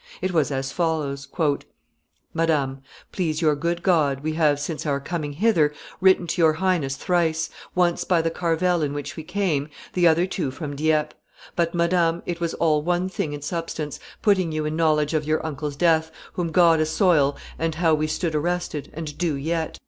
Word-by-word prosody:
It 185 - -1
was 160 -5 +2
as 135 -1 -2
follows: 150 -5 -1
[Sidenote: - - -22
The 165 - +2
letter 145 -1 +1 0.9
itself.] 140 -3 +1
"MADAM, 135 0 -12 0.3
Please 160 -5 -1
your 155 -3 +3
good 170 +3 -2
God, 150 -7 +2
we 155 +1 -2
have, 150 -3 +2
since 150 +1 -4
our 140 -1 +1
coming 150 0 -4
hither, 165 -4 +3 0.3
written 190 -1 +4
to 170 +1 -1
your 160 -1 +5
highness 160 -6 0
thrice; 160 0 0 0.2
once 175 -1 +2
by 175 -2 +2
the 165 - 0
carvel 170 +1 +1
in 145 -2 -1
which 145 -1 -5
we 160 - -5
came, 160 -4 -1 0.2
the 175 -1 +4
other 165 +2 +4
two 185 -6 -2
from 145 +1 -6
Dieppe. 155 0 +1 0.4
But, 170 0 0
madam, 170 -1 +2
it 175 -1 -3
was 170 -1 -2
all 155 -2 +2
one 175 +3 0
thing 160 -5 -3
in 145 -1 -6
substance, 160 -3 -4 0.2
putting 190 -5 +3
you 155 0 -2
in 155 +1 -2
knowledge 155 -2 +2
of 155 -1 0
your 155 +1 0
uncle's 150 -1 -4
death, 160 0 +2 0.2
whom 170 -2 -2
God 165 -2 +5
assoil, 155 -3 +3 0.2
and 165 -1 -1
how 165 -1 +3
we 155 0 +1
stood 160 +1 -2
arrested, 160 -1 -2
and 155 -2 -5
do 170 -4 +1
yet. 160 +3 -2
160 Hz, 195 wpm, -24 LUFS, 150-175 Hz, 0.9 s, your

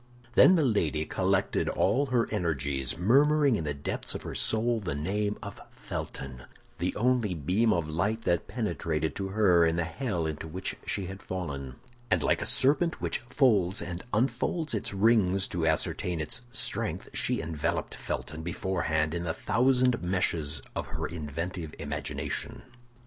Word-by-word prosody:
Then 185 - +7
Milady 100 - +1
collected - - +1
all 140 +4 +2
her 125 -3 +2
energies, 70 - -1
murmuring 140 - +4
in 80 - -2
the 75 - -1
depths 70 - -4
of - - -5
her - - -5
soul 115 +1 +1
the 90 -9 -3
name 100 +7 -1
of - - -8
Felton—the 70 +7 -6
only 120 -5 +1
beam 95 +9 +2
of 85 -5 +1
light 100 +9 -1
that 85 -4 +1
penetrated 85 -8 -2
to 95 - -2
her 95 -4 +4
in 80 0 +2
the 85 - +1
hell 85 0 -2
into 80 0 -4
which 90 +4 -3
she 100 - -1
had 95 +2 -7
fallen; 70 -8 -5 0.3
and 90 -5 +2
like - - +2
a - - +1
serpent 155 +6 +3
which - - -2
folds 110 -7 +2
and 85 +1 -4
unfolds 130 +8 0
its 110 - -1
rings 100 -2 +3
to 85 -2 -1
ascertain 80 +2 0
its 75 +11 -1
strength, 130 +1 0
she - - +1
enveloped 80 +1 -2
Felton 75 +1 -4
beforehand 80 -3 -1
in 85 0 -2
the 80 -1 -2
thousand 125 +4 +2
meshes 85 -6 0
of - - -3
her - - -4
inventive 80 +1 -5
imagination. - - -4
90 Hz, 155 wpm, -29 LUFS, 80-115 Hz, 0.3 s, Then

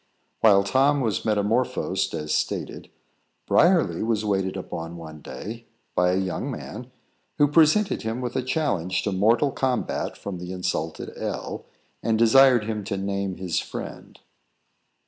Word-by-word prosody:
While 100 -3 +6
Tom 135 +7 +3
was 110 -5 -1
metamorphosed 105 -3 0
as 75 -1 -3
stated, - - -2 0.6
Briarly 165 - +3
was 110 -1 0
waited 95 -2 0
upon 85 +1 -6
one 80 -2 -10
day, 115 +8 -8 0.3
by 90 0 +3
a - - +1
young 95 +8 -2
man, 125 -1 -7 0.5
who 145 - +5
presented 165 +7 +3
him 110 +2 -3
with 125 -2 -4
a 130 - +1
challenge 125 - -1
to 105 - -1
mortal 115 +8 +3
combat 130 -3 -2
from 95 -3 -6
the 90 +1 -6
insulted 90 -3 -3
L, - - -5 0.4
and 115 -1 +1
desired 120 +1 +6
him 105 -1 -3
to 100 -1 -3
name 100 -1 -2
his 90 -2 -1
friend. - - -8
105 Hz, 145 wpm, -25 LUFS, 95-125 Hz, 0.6 s, While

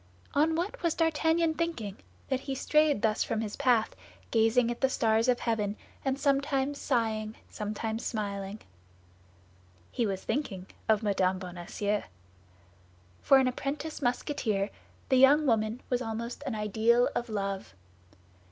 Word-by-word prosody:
On 315 +3 +3
what 390 +9 -3
was 335 -3 +1
D'Artagnan 325 0 +2
thinking, 310 - -3 0.3
that 265 -1 +1
he 270 0 -4
strayed 300 -3 +2
thus 220 -1 +2
from 225 - -2
his 210 -2 -4
path, 245 -5 +2 0.4
gazing 230 +1 +3
at 240 - -6
the 265 - +4
stars 225 -2 +2
of 250 -1 +2
heaven, 210 -3 0 0.3
and 270 0 -1
sometimes 280 0 +1
sighing, 220 -3 0 0.2
sometimes 220 +2 -3
smiling? 200 -1 -4 1.3
He 235 - 0
was 190 -1 -3
thinking 195 -11 -2 0.2
of 220 0 +3
Mme. 190 -2 +2
Bonacieux. 185 +3 -3 1.2
For 275 - +6
an 265 -1 +4
apprentice 285 +5 -3
Musketeer 245 -5 0 0.4
the 260 - +4
young 285 +4 +6
woman 225 -1 +1
was 250 0 +1
almost 235 +2 -4
an 255 - -2
ideal 220 +3 +3
of 240 - -2
love. 195 - -3
235 Hz, 135 wpm, -29 LUFS, 215-275 Hz, 1.3 s, For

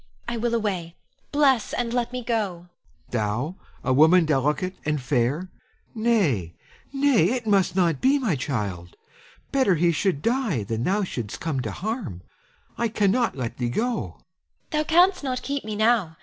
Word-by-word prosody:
I 235 - -2
will 235 +1 0
away; 185 -7 -2 0.4
bless, 275 -6 +3
and 240 -1 -1
let 245 -1 0
me 250 -1 -4
go. 225 -5 0
Helon. 170 +1 -16 0.4
Thou, 120 - -1 0.3
a 130 - +1
woman 160 +5 +6
delicate 150 +5 0
and 150 0 0
fair! 135 +7 0 0.4
Nay, 190 - +1 0.4
nay, 275 - +3
it 245 -3 -3
must 200 -4 +2
not 170 -6 +2
be, 270 +2 +4
my 230 - 0
child! 100 - -4 0.6
Better 260 -9 +3
he 170 +1 +3
should 165 -3 0
die 230 - 0
than 115 +3 -3
thou 200 +3 +1
shouldst 120 - -5
come 155 -5 -2
to 115 -5 -3
harm. 185 - -4 0.6
I 235 - +2
cannot 220 - +1
let 120 -3 -4
thee 120 -1 0
go. 235 - 0
Ione. 90 -6 -7 0.6
Thou 305 0 +1
canst 350 +2 +4
not 255 -2 -2
keep 280 0 -3
me 215 0 -4
now. 215 -7 +2
190 Hz, 165 wpm, -24 LUFS, -, 0.6 s, woman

